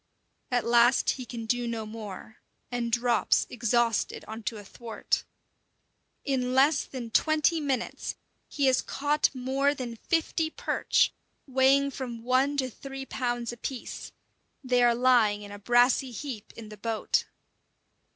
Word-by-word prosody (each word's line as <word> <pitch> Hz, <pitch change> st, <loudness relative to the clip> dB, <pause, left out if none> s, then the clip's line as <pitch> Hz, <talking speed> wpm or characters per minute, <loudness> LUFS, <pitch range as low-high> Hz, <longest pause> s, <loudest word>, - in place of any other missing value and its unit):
At 245 Hz, -1 st, 0 dB
last 240 Hz, +2 st, +4 dB
he 255 Hz, -2 st, -6 dB
can 230 Hz, -1 st, -6 dB
do 245 Hz, +1 st, 0 dB
no 230 Hz, -2 st, -3 dB
more, 215 Hz, 0 st, -8 dB, 0.3 s
and 240 Hz, -1 st, -2 dB
drops 235 Hz, -1 st, +2 dB
exhausted 235 Hz, -1 st, 0 dB
on 220 Hz, +1 st, -7 dB
to 225 Hz, -, -2 dB
a 205 Hz, -, -10 dB
thwart. 230 Hz, +2 st, -3 dB, 1.0 s
In 255 Hz, -2 st, 0 dB
less 280 Hz, +4 st, +4 dB
than 240 Hz, -4 st, -7 dB
twenty 310 Hz, +4 st, +3 dB
minutes 270 Hz, -5 st, -2 dB, 0.3 s
he 285 Hz, -, -1 dB
has 260 Hz, -1 st, +4 dB
caught 290 Hz, +2 st, +1 dB
more 270 Hz, +3 st, +1 dB
than 245 Hz, -3 st, -5 dB
fifty 325 Hz, +3 st, 0 dB
perch, 475 Hz, +9 st, +1 dB, 0.3 s
weighing 270 Hz, +1 st, +3 dB
from 240 Hz, -4 st, -6 dB
one 260 Hz, +4 st, +2 dB
to 260 Hz, -2 st, +1 dB
three 270 Hz, +2 st, -8 dB
pounds 240 Hz, -3 st, -2 dB
apiece; 240 Hz, +1 st, -6 dB, 0.5 s
they 250 Hz, -1 st, +2 dB
are 240 Hz, -1 st, +5 dB
lying 230 Hz, -4 st, +3 dB
in 205 Hz, -, -10 dB
a 205 Hz, -, -8 dB
brassy 245 Hz, +4 st, +3 dB
heap 245 Hz, -2 st, -7 dB
in 225 Hz, -2 st, -10 dB
the 210 Hz, -, -10 dB
boat. 225 Hz, +1 st, 0 dB
245 Hz, 140 wpm, -28 LUFS, 230-270 Hz, 1.0 s, are